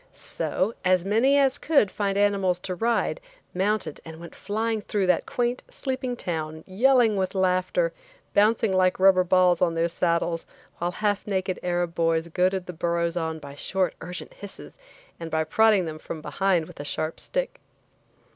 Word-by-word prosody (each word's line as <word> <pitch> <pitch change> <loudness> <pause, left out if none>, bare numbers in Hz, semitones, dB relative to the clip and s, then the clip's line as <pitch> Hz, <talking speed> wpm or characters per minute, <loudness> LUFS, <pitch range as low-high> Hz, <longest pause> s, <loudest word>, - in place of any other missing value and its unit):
So, 205 +5 -2
as 185 -1 +3
many 235 +8 +3
as 270 -2 +3
could 280 -11 +3
find 200 -1 -1
animals 200 -3 +2
to 185 - -4
ride, 230 - 0 0.3
mounted 205 +4 -1
and 160 -1 -10
went 170 -1 -10
flying 220 +2 -2
through 205 -2 -1
that 180 -2 +1
quaint, 245 0 -1
sleeping 260 -2 -3
town, 160 -6 -4
yelling 230 +2 +3
with 190 +1 -1
laughter, 190 - +1 0.4
bouncing 215 0 +3
like 185 0 +2
rubber 190 -1 +6
balls 180 0 +3
on 170 -2 +2
their 165 +1 +2
saddles, 170 -1 -1 0.3
while 175 - 0
half 205 +3 -1
naked 190 -2 -1
Arab 175 -1 -1
boys 165 0 +1
goaded 185 +2 0
the 180 - -7
burros 170 0 -1
on 160 -2 -2
by 140 -2 -10
short, 185 +5 -1
urgent 180 +2 -8
hisses, 200 -1 -11 0.4
and 165 - -6
by 160 0 0
prodding 210 +3 +3
them 155 -1 -6
from 160 - -7
behind 180 +1 0
with - - -14
a - - -4
sharp 155 +2 -3
stick. - - -2
185 Hz, 165 wpm, -25 LUFS, 170-210 Hz, 0.4 s, rubber